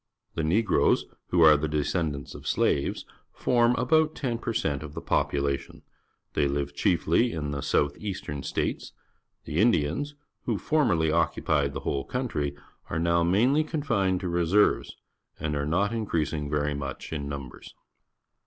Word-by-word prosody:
The 80 - -2
Negroes, 100 +8 +2 0.2
who 85 -2 +3
are 75 -1 +8
the 75 +2 -1
descendants 75 -1 -2
of - - -9
the - - -10
slaves, 70 - +1 0.3
form 120 -1 +2
about 155 +5 +2
ten 120 -4 -2
per 115 - -3
cent 75 -10 -1
of 75 -1 -9
the - - -4
popula 70 -1 +1
tion. - - -15 0.5
They 70 - +2
live 70 0 -2
chiefly 85 +9 +2
in 75 -3 -3
the 70 -1 -3
south 70 0 +1
eastern 95 -9 -5
states. - - -3 0.5
The 75 - -2
Indians, 115 - +1 0.3
who - - 0
formerly 90 - +2
occupied 75 -3 +1
the - - -5
whole 70 -1 -1
country, 75 - -2 0.3
are 80 - -2
now 85 +1 +2
mainly 120 - +3
confined 115 - 0
to 95 - -3
reser^•es 85 +4 +2 0.5
and 75 -1 -2
are 70 0 -1
not 100 +7 +1
increasmg 80 -9 -2
very 75 0 0
much 70 +2 -5
in 70 -2 -4
numbers. 70 -3 -8
80 Hz, 155 wpm, -27 LUFS, 70-110 Hz, 0.5 s, are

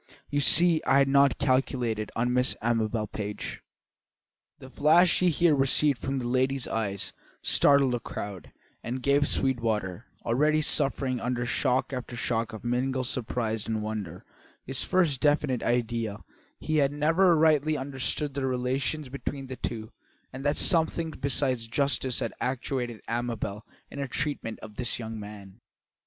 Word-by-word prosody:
You 145 - +1
see 155 - +5
I 135 - +3
had 140 0 +4
not 140 -1 +4
calculated 125 -5 0
on 125 +2 0
Miss 125 0 +2
Amabel 115 -1 0
Page." 105 0 -6 1.0
The 130 - -13
flash 165 +5 +4
he 180 - +3
here 170 0 +3
received 135 -1 +2
from 135 +3 -3
that 125 - -3
lady's 130 +1 0
eyes 100 -3 -3 0.3
startled 140 -2 +4
the 120 - 0
crowd, 100 -6 -7 0.3
and 125 +2 -5
gave 140 +1 +3
Sweetwater, 115 -6 -1 0.2
already 150 +6 +2
suffering 135 -3 +1
under 120 0 -2
shock 125 +3 0
after 125 -1 -5
shock 115 -1 -1
of 110 - -9
mingled 130 +2 -1
surprise 115 -3 -2
and 110 -1 -2
wonder, 105 -5 -5 0.4
his 130 -1 -2
first 170 -8 +1
definite 145 -4 +2
idea 115 -2 -1
that - - -18
he 155 0 +1
had 140 -2 +3
never 165 +5 +3
rightly 155 -1 +3
understood 140 +2 -3
the 135 -1 -2
relations 130 +4 -1
between 140 +1 -5
these 130 -1 -8
two, 110 -2 -4 0.4
and 135 +1 -7
that 145 +1 +1
something 165 -1 +2
besides 130 -5 +1
justice 135 0 0
had - - -2
actuated 125 -2 -3
Amabel 115 -3 -3 0.2
in 140 - -7
her 140 - -2
treatment 130 -4 -2
of 105 -1 -11
this 125 -2 +1
young 110 -1 -6
man. 105 0 -11
130 Hz, 150 wpm, -27 LUFS, 115-140 Hz, 1.0 s, see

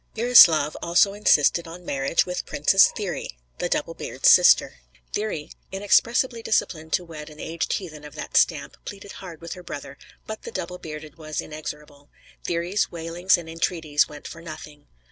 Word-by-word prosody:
Burislav 175 -11 +6
also 175 +4 +3
insisted 170 -4 +3
on 175 +2 -11
marriage 135 +2 0
with 180 0 -5
Princess 195 +7 +5
Thyri, 185 - -5 0.2
the - - -2
Double - - -1
beard's - - +2
sister. - - +5 0.3
Thyri, 205 -8 -3 0.2
inexpressibly 230 +5 +2
disinclined 160 -8 -1
to 180 - +1
wed 155 -2 -9
an 150 0 -15
aged 165 0 -3
heathen 155 -6 -6
of 150 0 -11
that - - -7
stamp, 145 -4 +2
pleaded 200 0 -9
hard 175 -4 -10
with 170 - -6
her 180 - -10
brother; 140 -4 -9 0.3
but 220 0 -7
the - - -8
Double 180 0 -5
bearded 155 0 -9
was 155 -1 -5
inexorable; 150 -1 -8 0.4
Thyri's 175 +4 -1
wailings 170 +3 +1
and 170 -2 -9
entreaties 160 -2 0
went 150 -1 -10
for 165 - -10
nothing. 155 -2 -11
165 Hz, 165 wpm, -24 LUFS, 150-185 Hz, 0.4 s, Burislav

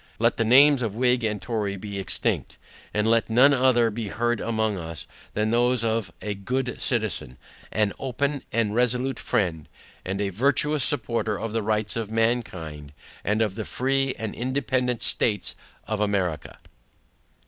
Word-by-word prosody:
Let - - +2
the 115 - +2
names 135 +4 +6
of 110 -4 -2
Whig 125 0 +2
and 105 -2 0
Tory 105 -4 -2
be 100 0 -6
extinct; 95 - -1 0.3
and 105 +1 0
let 115 0 +3
none 130 +5 +6
other 125 -3 +3
be 110 0 -4
heard 120 +3 0
among 110 -2 0
us, 80 -1 -6 0.3
than 105 +1 0
those 120 0 +2
of 110 -4 -1
A 105 - -2
GOOD 125 +6 -3
CITIZEN, 100 - -2 0.3
AN 105 -2 +1
OPEN 140 +2 -1
AND 115 -3 +1
RESOLUTE 125 +2 +1
FRIEND, 80 -6 -1 0.3
AND 95 +1 -3
A 100 -1 0
VIRTUOUS 140 +7 +1
SUPPORTER 120 -5 0
OF 115 -1 -4
THE 115 - 0
RIGHTS 110 +1 -1
OF 110 -2 -3
MANKIND 90 -11 -2 0.3
AND 105 +2 +2
OF 105 -4 -1
THE 110 +2 -4
FREE 135 +1 0
AND 110 -2 -4
INDEPENDANT 130 -1 -1
STATES 105 -5 +1 0.3
OF 110 -1 -2
AMERICA. 95 -6 -1
115 Hz, 160 wpm, -25 LUFS, 105-125 Hz, 0.3 s, names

